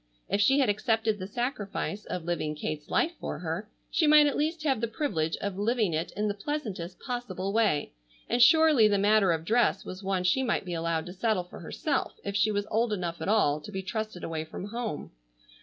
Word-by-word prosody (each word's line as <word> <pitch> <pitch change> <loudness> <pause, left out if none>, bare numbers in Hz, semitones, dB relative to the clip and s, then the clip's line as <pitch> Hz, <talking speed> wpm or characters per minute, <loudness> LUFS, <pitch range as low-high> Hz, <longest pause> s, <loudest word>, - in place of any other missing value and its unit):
If 205 - +1
she 265 +7 +5
had 270 -3 +3
accepted 220 +1 +1
the 185 - -5
sacrifice 210 -3 -3
of 180 -2 -4
living 155 -3 -2
Kate's 150 0 -5
life 335 - +2
for - - -4
her, 175 +5 -4 0.2
she 320 - +2
might 300 0 +8
at 290 - +1
least 315 +2 -1
have 270 -7 +1
the 235 - +1
privilege 190 - -1
of 200 -1 -4
living 215 -4 +1
it 160 +2 -2
in 210 +1 +1
the 205 - 0
pleasantest 200 - -5
possible 200 -7 -4
way, 210 -10 +1 0.3
and 245 - +1
surely 305 -3 +7
the 205 -1 +2
matter 205 -1 +4
of 165 -1 -1
dress 230 -1 +2
was 185 +1 -7
one 190 -2 -1
she 180 +9 +3
might 235 -6 0
be 175 - -4
allowed 165 -1 -1
to 180 - -8
settle 200 -1 0
for 180 - -12
herself 275 - -2
if 200 0 -4
she 205 +1 +3
was 205 -1 -1
old 225 +1 +1
enough 175 -4 -3
at - - -2
all 155 -9 +3
to 210 - -9
be 190 -1 -4
trusted 215 -2 -4
away 160 -1 -3
from 185 +5 -7
home. 230 -7 -4
205 Hz, 215 wpm, -28 LUFS, 180-235 Hz, 0.3 s, might